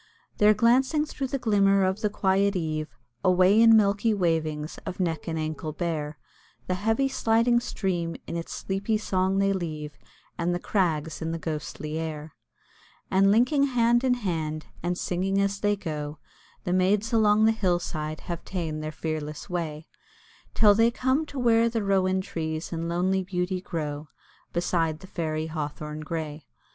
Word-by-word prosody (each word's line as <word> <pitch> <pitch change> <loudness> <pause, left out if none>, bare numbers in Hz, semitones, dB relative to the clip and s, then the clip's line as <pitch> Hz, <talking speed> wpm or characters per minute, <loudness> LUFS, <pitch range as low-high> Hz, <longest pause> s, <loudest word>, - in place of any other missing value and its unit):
They're 210 0 +6
glancing 260 +7 +3
through 275 -3 -4
the 275 - -2
glimmer 200 -5 +3
of 190 +3 -1
the 210 - +1
quiet 195 0 +1
eve, 155 -3 -2 0.3
Away 185 +4 +5
in 225 -1 +8
milky 210 +1 +2
wavings 160 -4 -1
of 185 - -6
neck 165 -4 -1
and 160 -1 -2
ankle 155 0 -3
bare; 155 -2 -3 0.5
The 185 - -1
heavy 225 +8 +1
sliding 235 -2 +2
stream 175 -7 -2
in - - -5
its 170 0 -5
sleepy 200 +3 -1
song 190 -2 0
they 195 0 +3
leave, 155 -5 -5 0.4
And 175 +1 +1
the - - -2
crags 160 -6 -1
in 160 0 -2
the - - -2
ghostly 155 -1 -4
air: 155 -1 -5 0.8
And 195 +1 +4
linking 250 +7 +4
hand 240 -2 +2
in 255 -1 +3
hand, 160 -8 -3 0.2
and 175 +1 -1
singing 190 +3 0
as 200 0 0
they 205 0 +2
go, 150 -5 -5 0.5
The 180 - -1
maids 200 +5 +2
along 215 -1 +4
the 220 - +5
hill 190 -6 +1
side 155 -2 -5
have 170 -1 -5
ta'en 165 -5 -3
their 155 0 -4
fearless 155 +2 -5
way, 160 -3 -3 0.7
Till 210 -2 +6
they 225 +3 +4
come 260 +5 0
to 285 - -9
where 230 -2 +4
the 225 -2 -2
rowan 190 -1 +2
trees 160 -3 -4
in 165 0 -3
lonely 185 +3 +1
beauty 180 0 -2
grow 150 -4 -4 0.4
Beside 165 -2 0
the - - -10
Fairy 155 -4 -3
Hawthorn 150 -1 -5
grey. 155 -2 -5
185 Hz, 165 wpm, -26 LUFS, 160-210 Hz, 0.8 s, in